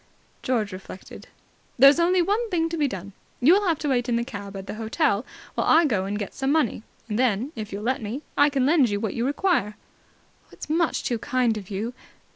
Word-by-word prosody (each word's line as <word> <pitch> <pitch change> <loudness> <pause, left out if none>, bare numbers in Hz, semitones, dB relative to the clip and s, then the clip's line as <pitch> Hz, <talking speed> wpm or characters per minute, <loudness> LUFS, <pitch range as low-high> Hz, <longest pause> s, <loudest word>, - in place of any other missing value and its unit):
George 230 -5 -1
reflected. 185 0 -10 0.5
"There's 275 +5 +7
only 355 +1 +3
one 430 +6 0
thing 330 -4 0
to 335 - -3
be 300 -3 +1
done. 195 -3 -7 0.3
You 285 +8 +6
will 405 0 +2
have 330 -3 +2
to 295 - -3
wait 245 -2 0
in 235 - +1
the 235 - 0
cab 200 -5 -7
at 190 - -7
the - - -6
hotel, 225 +1 0 0.3
while - - -1
I 330 +1 +6
go 210 -9 0
and 200 +1 -3
get 205 -2 -5
some 270 0 -1
money. 295 -9 +1 0.3
Then, 235 +3 0
if 215 -3 -6
you'll 200 +1 -5
let 255 +2 0
me, 230 +8 -5
I 290 +1 +5
can 275 -3 0
lend 285 -4 +4
you 205 0 -1
what 220 -1 -2
you 230 - -2
require." 290 - 0 0.8
"It's - - -9
much 330 0 +1
too 240 -2 -1
kind 250 -3 +1
of 200 -3 -8
you. 215 +5 -3
250 Hz, 220 wpm, -24 LUFS, 210-305 Hz, 0.8 s, There's